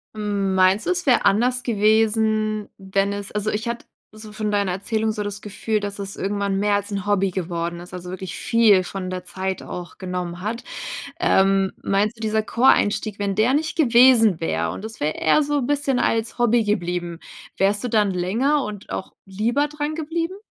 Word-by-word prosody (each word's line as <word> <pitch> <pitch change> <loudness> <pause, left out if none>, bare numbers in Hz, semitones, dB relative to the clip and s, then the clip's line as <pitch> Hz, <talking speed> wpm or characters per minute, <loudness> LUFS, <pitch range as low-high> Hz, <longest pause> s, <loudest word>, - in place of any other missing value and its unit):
Hm, 200 -2 -1
meinst 185 +3 +3
du, - - +1
es 360 0 -1
wär 255 -4 +3
anders 240 +5 +3
gewesen, 215 -1 +1
wenn 195 +1 -1
es 200 0 -6
also, 210 +1 -1
ich 220 +3 -3
hatte 235 0 -4 0.3
so 215 0 -11
von 215 0 -3
deiner 200 -3 +1
Erzählung 220 +4 -1
so 210 -1 -3
das 205 0 -5
Gefühl, 210 +1 -2
dass 205 0 -5
es 195 0 -5
irgendwann 200 0 -1
mehr 205 +1 +2
als 205 +1 -2
'n 200 -1 -4
Hobby 195 -2 +1
geworden 170 -1 -3
ist, 180 - -12
also 180 0 -7
wirklich 185 -2 -6
viel 215 -6 +4
von 185 -1 -5
der 185 0 -5
Zeit 190 +1 -4
auch 175 -1 -8
genommen 180 -2 -4
hat. 225 +5 -4 0.6
Ähm, 195 0 +3
meinst 205 +3 +1
du, - - -17
dieser 220 0 0
Choreinstieg, 215 -3 +2
wenn 200 -1 -1
der 225 +5 +3
nicht 320 +2 -1
gewesen 235 - +5
wäre 80 +1 -1
und 210 - -8
das 220 0 -7
wäre 150 +1 0
eher 290 - +3
so 290 0 0
'n 250 - -1
bisschen 285 -3 +1
als 225 +1 0
Hobby 240 -1 +3
geblieben, 175 -4 -2 0.4
wärst 205 +3 +1
du - - 0
dann 215 -3 +2
länger 230 +11 +1
und 210 -1 -8
auch - - -5
lieber 230 +9 0
drangeblieben? 315 +4 -3
210 Hz, 190 wpm, -22 LUFS, 190-230 Hz, 0.6 s, gewesen